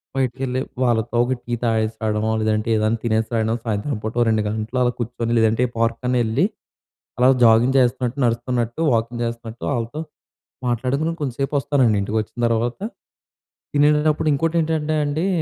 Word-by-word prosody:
బయటికెళ్ళి, 130 0 -1 0.2
వాళ్ళతో 120 -1 +1
ఒక 130 - 0
టీ 120 - -5
తాగేసి 110 -1 +1
రావడమో, 110 0 0
లేదంటే 110 +1 0
ఏదైనా 110 +1 +1
తినేసి 110 -1 0
రాయడం, 110 0 +1
సాయంత్రం 110 +4 -2
పూట 115 +2 +1
2 110 -1 +2
గంటలు 110 +4 -2
అలా 120 - +2
కూర్చొని, 120 0 -2
లేదంటే 110 +1 +3
ఏ - - -11
పార్క్ 115 0 +1
కన్నా 125 0 +1
వెళ్లి, 115 +8 +1 0.7
అలా 125 - +5 0.2
జాగింగ్ 115 +4 +5
చేస్తున్నట్టు, 125 +1 +1
నడుస్తున్నట్టు, 120 +3 -1
వాకింగ్ 115 +1 -1
చేస్తున్నట్టు, 115 0 -6
ఆళ్ళతో 120 +6 -3 0.7
మాట్లాడుకొని 130 +7 0
కొంచెం 135 -5 -2
సేపు 135 +2 -1
వస్తానండి. 130 -6 +2
ఇంటికొచ్చిన 110 +3 -3
తర్వాత, 115 +1 -1 1.0
తినేటప్పుడు 150 +2 +3
ఇంకోటేంటంటే 155 0 0
అండి, 150 +5 -1
120 Hz, 145 wpm, -21 LUFS, 110-130 Hz, 1.0 s, అలా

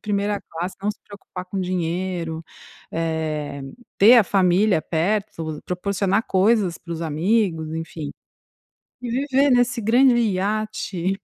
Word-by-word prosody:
primeira 205 -1 -1
classe, 175 +3 -6
não 210 - +1
se 210 - -10
preocupar 195 -2 -9
com 190 +1 -4
dinheiro. 175 -2 -2 0.5
Eh, 155 -3 -2 0.3
ter 225 +5 +8
a 230 - +6
família 190 0 +3
perto. 165 -3 -2
Proporcionar 195 +3 0
coisas 195 -2 +2
para 170 - -8
os 165 - -4
amigos, 165 0 0
enfim. 160 -2 -5 0.9
E 250 - -5
viver 275 +2 +2
nesse 245 -1 +3
grande 245 +4 +5
iate. 200 -3 -1
190 Hz, 125 wpm, -22 LUFS, 165-215 Hz, 0.9 s, ter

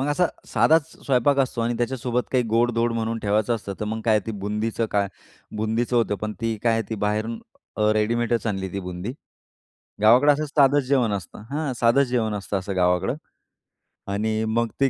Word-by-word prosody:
मग 135 - 0
असा 170 +5 +2 0.2
साधाच 160 0 +3 0.2
स्वयंपाक 135 +1 +3
असतो 130 -3 0
आणि 120 +1 0
त्याच्यासोबत 125 0 -1
काही 125 -1 +3
गोड-धोड 115 +1 +2
म्हणून 115 0 -2
ठेवायचं 105 +3 +1
असतं, 100 -3 -5
तर 105 - -1
मग 110 +1 -3
काय 110 -2 +4
ती - - -2
बुंदीचं 110 +2 -1
काय 100 -1 +1 0.5
बुंदीचं 115 +3 0
होतं, 115 -3 +2
पण 105 +1 -4
ती 115 -1 -1
काय 115 - +3
आहे, 115 0 +1
ती - - -1
बाहेरून 110 +2 -2 0.4
अ, 105 - 0
रेडीमेडच 115 +2 0
आणली 95 -3 -2
ती 100 - -3
बुंदी. 90 +5 -5 0.9
गावाकडे 125 +7 +6
असं 150 +2 -1
साधंच 145 -1 +3
जेवण 125 -6 +2
असतं 100 +1 -6
हां, 145 -1 -2
साधंच 120 +4 +4
जेवण 115 -4 0
असतं 100 0 -2
असं 95 +1 -5
गावाकडं 90 -1 +2 1.0
आणि 110 +2 0
मग 115 +1 +1
ती 135 - +5
115 Hz, 180 wpm, -24 LUFS, 105-125 Hz, 1.0 s, गावाकडे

